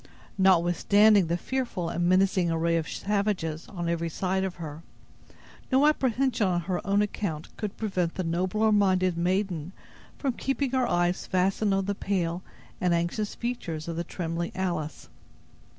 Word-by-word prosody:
Notwithstanding 190 +2 +5
the 170 +1 0
fearful 235 -7 -3
and 175 +1 0
menacing 185 -1 +3
array 165 +1 +1
of 160 -2 -1
savages 200 -6 -1
on 175 -4 -5
every 170 0 -1
side 190 +3 -1
of 190 -2 -3
her, 155 -2 -7 0.9
no 265 +3 +5
apprehension 260 -6 +2
on 175 -1 +1
her 180 +1 -2
own 200 +1 +3
account 170 -6 -4
could 210 -2 -5
prevent 185 -6 -1
the 185 - -2
nobler 185 +6 +1
minded 185 -3 +3
maiden 180 -1 -1 0.4
from 270 -3 -1
keeping 270 +1 -1
her 260 -2 +1
eyes 175 +1 +1
fastened 195 +2 +1
on 195 0 0
the 200 - 0
pale 180 -3 -1 0.4
and 180 -1 +3
anxious 170 +5 -2
features 175 -11 -4
of 165 - -3
the 170 - -2
trembling 170 0 -4
Alice. 170 -6 -3
185 Hz, 150 wpm, -27 LUFS, 170-205 Hz, 0.9 s, Notwithstanding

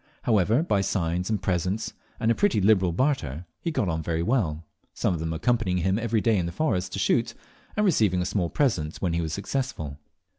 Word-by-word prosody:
However, 110 - +3
by 100 - +1
signs 90 -1 -1
and 110 -2 +1
presents 95 +3 -1 0.3
and 115 - +2
a - - +5
pretty 205 - +2
liberal 95 -3 +4
barter, 85 - -1
he - - -2
got 130 - 0
on 80 -1 -1
very 80 +1 -1
well, 85 - 0 0.3
some - - +1
of 85 - -3
them 80 0 -2
accompanying 95 +2 +1
him 95 +2 +1
every 115 -1 0
day 115 -1 +3
in 85 - -1
the - - -4
forest 90 - -1
to - - -3
shoot, 115 +5 +1 0.4
and 210 - +3
receiving 105 - +3
a 90 - 0
small 90 -3 0
present 90 - 0
when 90 -3 -1
he 85 - 0
was 80 -2 -3
successful. 100 - -3
95 Hz, 210 wpm, -26 LUFS, 85-115 Hz, 0.4 s, a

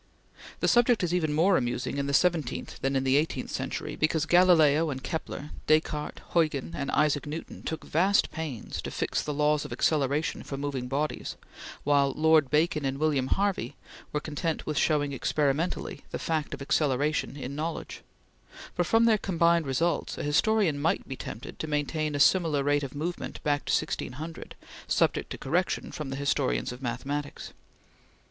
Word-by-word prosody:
The - - +2
subject 240 -3 +4
is 175 -1 0
even 160 -4 +1
more 175 +6 +4
amusing 125 +2 -2
in 140 - -1
the 140 - -2
seventeenth 165 -6 0
than 135 +1 0
in 135 - +1
the 135 +1 +3
eighteenth 155 +2 -1
century, - - -4
because 155 0 +1
Galileo 165 -3 +5
and 130 -2 -5
Kepler, 155 -3 -5 0.2
Descartes, 155 -1 +1
Huygens, 155 -3 +1
and 140 -1 -3
Isaac 150 -1 +1
Newton 155 +3 -6
took 160 - -4
vast 190 +6 +2
pains 155 -8 -5
to - - -5
fix - - -1
the 150 - -3
laws 150 0 +2
of 145 - -8
acceleration 145 +3 +1
for 140 - -6
moving 135 -3 -3
bodies, 145 +4 -2 0.5
while 140 -1 +3
Lord 155 -3 +4
Bacon 150 0 +2
and 135 0 -1
William 145 -3 +1
Harvey 195 - 0 0.4
were 150 - 0
content 155 +2 -3
with 155 - -2
showing 145 -3 +1
experimentally 145 +3 -1
the - - -4
fact 155 -3 -2
of - - -8
acceleration 145 0 0
in 135 -1 -5
knowledge; 160 +2 -4 0.7
but 175 -2 0
from 225 +5 +4
their 220 -2 +4
combined 170 -4 +2
results 165 +6 0
a - - -4
historian 160 0 +2
might 160 - 0
be 135 - -5
tempted 115 - -8
to 160 - -3
maintain 150 0 -1
a - - -1
similar 155 -3 +4
rate 145 +1 +2
of 140 -1 -6
movement 170 +4 -4
back 145 -1 0
to - - -1
1600, 155 +6 -3 0.3
subject - - +1
to - - -5
correction 175 +7 -1
from 150 -4 -5
the 135 - -3
historians 90 - 0
of 125 +2 -9
mathematics. 135 +4 -4
150 Hz, 170 wpm, -28 LUFS, 140-165 Hz, 0.7 s, Galileo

